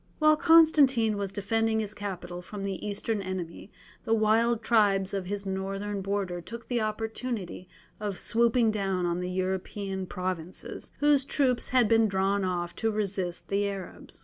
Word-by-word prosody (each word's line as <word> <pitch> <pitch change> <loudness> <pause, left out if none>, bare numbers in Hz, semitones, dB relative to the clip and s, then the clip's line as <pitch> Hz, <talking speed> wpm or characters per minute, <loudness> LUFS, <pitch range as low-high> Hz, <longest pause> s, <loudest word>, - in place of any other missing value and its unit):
While 310 0 +5
Constantine 295 -9 +5
was 200 -2 -3
defending 220 +2 0
his 215 -1 -2
capital 185 -4 -6
from 195 +2 -7
the 195 -2 -4
Eastern 210 +1 -2
enemy, 185 0 -6 0.3
the 225 - +2
wild 225 +1 +2
tribes 200 -4 +3
of 195 -2 -3
his 200 +1 -3
northern 195 +1 -3
border 190 -3 -2
took 230 +7 -9
the 240 -2 -1
opportunity 215 -3 -4 0.3
of 205 -3 -3
swooping 235 0 +3
down 195 -4 -1
on 175 0 0
the 180 0 -3
European 190 +1 -3
provinces, 180 -1 -5
whose 290 -2 +4
troops 260 -3 0
had 250 -3 +4
been 225 0 +4
drawn 195 0 +1
off 175 -2 -2
to 225 - +1
resist 195 -4 -3
the 200 0 +1
Arabs. 195 -2 -8
200 Hz, 155 wpm, -28 LUFS, 190-225 Hz, 0.3 s, While